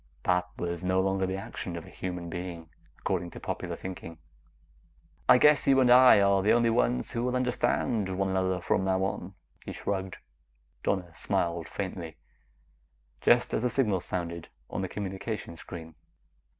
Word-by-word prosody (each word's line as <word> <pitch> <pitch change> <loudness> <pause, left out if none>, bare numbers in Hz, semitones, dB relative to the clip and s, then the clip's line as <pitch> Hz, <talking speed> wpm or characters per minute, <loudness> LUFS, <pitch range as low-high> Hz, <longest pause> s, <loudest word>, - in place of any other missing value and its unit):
That 90 0 +1
was 85 0 -3
no 95 +1 +2
longer 95 0 +1
the 95 - -2
action 90 -2 -6
of 85 - -6
a - - -15
normal - - -14
human 90 -2 -4
being, 85 -2 -6 0.3
according 90 -2 -2
to - - -10
popular - - -4
thinking. 90 -3 -8 1.1
"I - - +9
guess 150 +2 +5
you 135 -1 +6
and 125 -2 +5
I 125 -3 +8
are 100 -1 +4
the 100 - +4
only 115 -1 +3
ones 60 - +1
who 115 - -2
will 125 0 0
understand 120 -4 0
one 95 +1 -1
another 95 -1 0
from 95 - +1
now 95 0 +1
on," 95 -1 -3 0.3
he - - -6
shrugged. 95 -2 -3 0.6
Donna 90 -4 -1
smiled 85 -1 -1
faintly, 90 -5 -5 1.0
just - - +4
as - - +1
the 125 - +1
signal 110 -8 +1
sounded 85 -2 -4 0.2
on - - -2
the 95 - -3
communication 95 -1 -5
screen. 80 -1 -9
95 Hz, 165 wpm, -29 LUFS, 85-100 Hz, 1.1 s, I